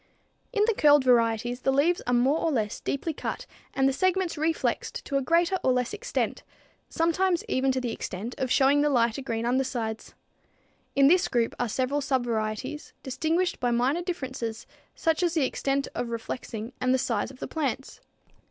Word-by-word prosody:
In 420 -4 +2
the 460 - +2
curled 295 -6 +5
varieties 240 -1 +2
the 270 - +2
leaves 305 +6 +2
are 245 - +1
more 265 +6 +3
or 330 - 0
less 215 -6 -1
deeply 315 +4 -2
cut - - -5 0.3
and 270 -1 +2
the 270 - +2
segments 370 +2 +1
reflexed 320 +1 -1
to 280 - -4
a 275 - +3
greater 335 +6 +2
or 260 - +3
less 250 -1 0
extent, - - -2 0.5
sometimes 340 +2 +1
even 265 +1 +1
to 260 - 0
the 245 -2 -2
extent 220 +2 -5
of 260 - -1
showing 280 +2 +4
the 295 - +3
lighter 235 -1 +2
green 230 -3 -3
undersides. 240 -3 -2 0.8
In 275 - +5
this 355 +4 +4
group 235 -2 0
are 245 - 0
several 265 +5 0
subvarieties, 240 0 -2
distinguished 320 +7 0
by 245 - +1
minor 250 +8 +1
differences, 260 - -4 0.3
such 325 +1 +1
as 345 -1 +1
extent 275 -1 0
of 245 - -3
reflexing 230 0 -5
and 255 +1 +2
size 230 -4 -1
of 265 - -13
the - - -5
plants. 275 -4 -3
265 Hz, 170 wpm, -27 LUFS, 240-320 Hz, 0.8 s, curled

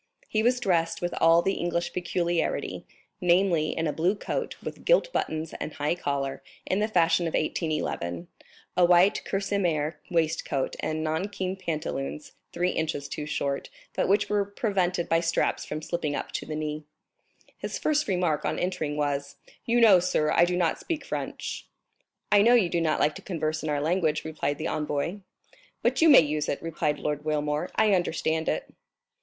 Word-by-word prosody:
He 215 - 0
was 245 +2 +3
dressed 170 -7 +1
with 175 -1 -2
all 165 +1 +6
the 195 - +1
English 175 0 -2
peculiarity, 175 -1 -1 0.3
namely, 175 -3 +2
in 165 - 0
a 150 - 0
blue 175 +6 +1
coat, - - -3
with - - -7
gilt - - +3
buttons 160 0 -2
and 155 - -5
high 145 +2 0
collar, 140 -5 -2 0.2
in 190 - 0
the 210 - +1
fashion 170 -4 +3
of 165 - -2
1811, 120 - -2 0.5
a 180 - +4
white 175 +3 +5
kerseymere 175 -6 -1
waistcoat, 160 -4 0
and 155 0 -2
nankeen 185 +4 -2
pantaloons, 155 -5 -4 0.2
three 180 +1 0
inches 155 -3 -2
too 150 +1 -5
short, 140 -2 -2 0.2
but - - 0
which 205 +2 +3
were 205 -1 +1
prevented 195 -4 -1
by 165 - +3
straps 165 0 0
from 155 +1 -5
slipping 155 -4 -2
up - - -4
to - - -4
the 155 - -4
knee. 155 0 -3 0.8
His - - -4
first 300 0 +1
remark 180 -6 +1
on - - -1
entering 170 -5 -2
was: 140 -1 -1 0.3
"You 240 +1 +3
know, 215 -6 +7
sir, 155 -3 +1
I 170 - +5
do 180 0 -1
not 170 -3 +1
speak 330 -3 -4
French?" - - -5 0.6
"I 205 -1 +7
know 235 +4 +6
you 205 -8 +3
do 170 0 0
not 160 -2 +1
like 150 - +3
to - - -11
converse 155 -4 -2
in 155 - -3
our 145 -1 0
language," 160 0 0
replied 145 -2 -2
the 155 - -5
envoy. 150 +5 -2 0.6
"But - - +2
you 325 - +7
may 280 - +10
use 150 -1 -1
it," - - -1
replied 150 -2 -1
Lord 150 -1 -3
Wilmore; 150 +1 -1
"I 215 -2 +4
understand 160 -3 0
it." - - -2
165 Hz, 175 wpm, -27 LUFS, 150-185 Hz, 0.8 s, may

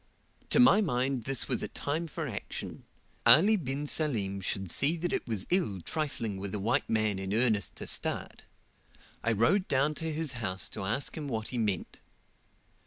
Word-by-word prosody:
"' - - -35
To - - +3
my 230 -4 +6
mind 130 - -1
this 135 -2 +1
was - - 0
a - - -2
time 160 +4 -3
for 160 0 -5
action: 110 -6 -6 0.4
Ali 205 +8 +7
bin 145 -5 -3
Salim 110 -11 0
should 95 -1 -2
see 155 +5 +3
that 175 +1 -2
it - - -2
was 110 -5 -2
ill 170 - +1
trifling 115 - -3
with 100 +1 -5
a - - -3
white 110 +5 0
man 110 -3 +1
in 95 +2 -2
earnest 110 -4 +1
to - - -7
start. - - 0 0.8
I 115 - +1
rode 115 - +2
down 140 +3 +1
to 160 0 -2
his 155 -2 -1
house 95 -6 -2
to - - -6
ask 115 +8 0
him 150 -3 -5
what 110 -4 -3
he 125 - -3
meant. 105 -6 -2
125 Hz, 185 wpm, -30 LUFS, 105-155 Hz, 0.8 s, Ali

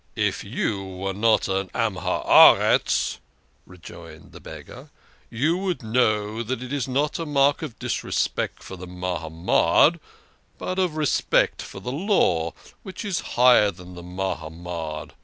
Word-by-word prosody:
" - - -40 0.2
If - - -8
you 100 -2 -2
were 95 0 -5
not 110 +2 +2
a 95 -1 -2
Man 115 -4 0
of 90 - -8 0.2
the - - +8
Earth," - - +1 0.5
rejoined 90 -3 -13
the - - -12
beggar, - - -11 0.2
" - - -33
you 150 +9 0
would 185 -8 -3
know 110 -1 0
that 120 +2 -4
it 125 +2 -7
is 140 -5 -2
not 145 +5 -1
a 165 - -3
mark 140 0 +2
of 145 -8 -7
disrespect - - -2
for 95 - -9
the 90 0 -10
Mahamad, 90 -2 +1 0.6
but 185 +1 -4
of 180 -4 0
respect 150 -2 +1
for - - -9
the 125 +6 -5
Law, 135 - +1 0.3
which 190 +1 -8
is 190 -4 -1 0.2
higher 120 -4 +6
than 90 -1 -11
the 90 - -10
Mahamad. 85 -3 -5
105 Hz, 160 wpm, -23 LUFS, 90-140 Hz, 0.6 s, the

